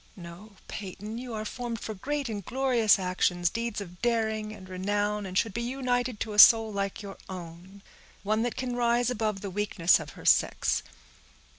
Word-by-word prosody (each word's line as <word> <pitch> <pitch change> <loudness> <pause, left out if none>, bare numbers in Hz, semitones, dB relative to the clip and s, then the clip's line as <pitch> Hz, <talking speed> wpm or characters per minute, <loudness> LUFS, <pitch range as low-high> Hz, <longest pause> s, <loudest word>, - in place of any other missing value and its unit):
No, 180 +4 -11
Peyton, 210 +3 -7
you 245 -2 -6
are 215 0 -4
formed 235 0 -4
for 220 - -5
great 280 +7 -3
and 210 -3 -4
glorious 245 -3 +3
actions, 180 -2 0
deeds 230 -2 -3
of 180 -2 -10
daring 220 -2 0
and 195 -3 -11
renown, 205 +2 -1
and 185 0 -4
should 225 -1 +1
be 235 - -2
united 245 -2 -1
to 220 - -3
a 210 - 0
soul 225 -1 +8
like 200 +1 -3
your 195 -1 -8
own; 185 +2 -10 0.4
one 215 +2 +1
that 240 0 -1
can 255 -1 -3
rise 240 0 +2
above 215 -4 -2
the 200 - -5
weakness 195 -4 +2
of 150 -3 -9
her - - -11
sex. - - +3
215 Hz, 180 wpm, -28 LUFS, 190-235 Hz, 0.4 s, soul